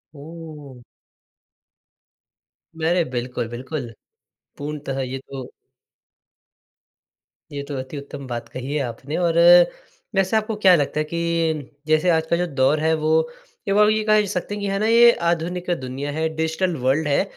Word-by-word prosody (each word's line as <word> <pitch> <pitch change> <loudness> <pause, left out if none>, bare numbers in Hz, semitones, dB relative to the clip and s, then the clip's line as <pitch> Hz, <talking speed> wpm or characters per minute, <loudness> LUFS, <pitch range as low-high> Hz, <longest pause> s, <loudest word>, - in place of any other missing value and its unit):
ओह! 150 -4 -11 1.9
अरे! 165 +2 +1
बिल्कुल, 125 -3 -4
बिल्कुल। 125 0 -6 0.7
पूर्णतः 145 -2 -4
ये 130 0 -3
तो 135 -1 -9 2.0
ये 145 - -4
तो 145 - -5
अति 130 +3 -6
उत्तम 140 0 -8
बात 120 -1 -5
कही 130 +3 -5
है 150 - 0
आपने 135 +5 -5
और 170 -2 +1 0.8
वैसे 195 +3 +2
आपको 220 0 -1
क्या 185 -1 +8
लगता 150 -1 0
है - - +2
कि 165 -4 -1 0.2
जैसे 155 +3 +3
आज 160 -2 +2
का 170 - +3
जो 180 0 0
दौर 140 +1 +2
है 160 +1 +2
वो 155 - +2 0.6
एक 195 - +2
बार 210 0 +6
को - - +4
ये 215 0 +1
कह 215 -1 +4
सकते 200 +1 -3
हैं, 200 -1 -3
हैं 195 - -1
ना 215 - +1
ये 235 +1 +7 0.2
आधुनिक 175 +2 -2
दुनिया 130 +3 -4
है, 160 +2 -1
डिजिटल 160 +3 -1
वर्ल्ड 145 +4 +2
है। 140 +6 +2
155 Hz, 155 wpm, -22 LUFS, 135-180 Hz, 2.0 s, क्या